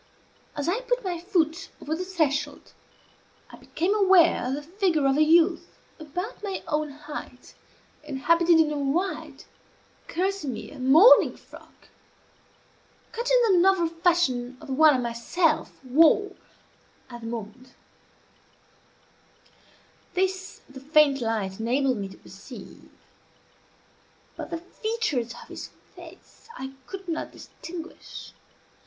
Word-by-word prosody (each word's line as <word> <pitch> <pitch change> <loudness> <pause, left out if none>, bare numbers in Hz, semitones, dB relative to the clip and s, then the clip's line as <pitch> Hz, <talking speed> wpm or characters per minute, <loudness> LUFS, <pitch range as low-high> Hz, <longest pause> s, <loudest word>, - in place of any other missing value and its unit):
As 290 +1 -3
I 375 +7 +1
put - - -1
my 355 -3 -3
foot 345 -2 -1
over 310 +2 -3
the 360 - -4
threshold, 300 -6 -2 0.8
I - - -12
became 360 +5 -1
aware 375 - +4
of 260 - -1
the 295 - -6
figure 340 -3 0
of 270 0 +3
a 300 - +3
youth 325 +2 +3 0.2
about 355 - -6
my 395 -2 -4
own 300 0 -1
height, 295 +1 -10 0.5
and 270 - -6
habited 335 +3 +4
in 310 -1 +3
a 295 - -2
white 335 +7 -2 0.6
kerseymere 325 - -3
morning 305 - +6
frock, - - -17 1.2
cut 475 +2 -3
in - - +4
the 360 - +5
novel 370 -3 +3
fashion 325 -8 0
of - - -13
the - - -2
one 305 +1 +6
I - - +2
myself 255 +7 0
wore 320 +10 +4 0.8
at 240 0 -9
the 225 - -7
moment. 235 +3 -8 2.4
This 375 0 -2
the 270 0 -11
faint 285 -1 +3
light 215 -4 -2
enabled 255 +2 +1
me 200 -1 -4
to 195 - -13
perceive; 200 +7 -13 1.5
but - - -7
the 335 - -3
features 345 - -3
of - - -18
his - - -7 0.3
face - - -15
I 265 0 -7
could 390 -1 -8
not 330 -2 -3
distinguish. 335 0 -10
315 Hz, 125 wpm, -26 LUFS, 265-365 Hz, 2.4 s, morning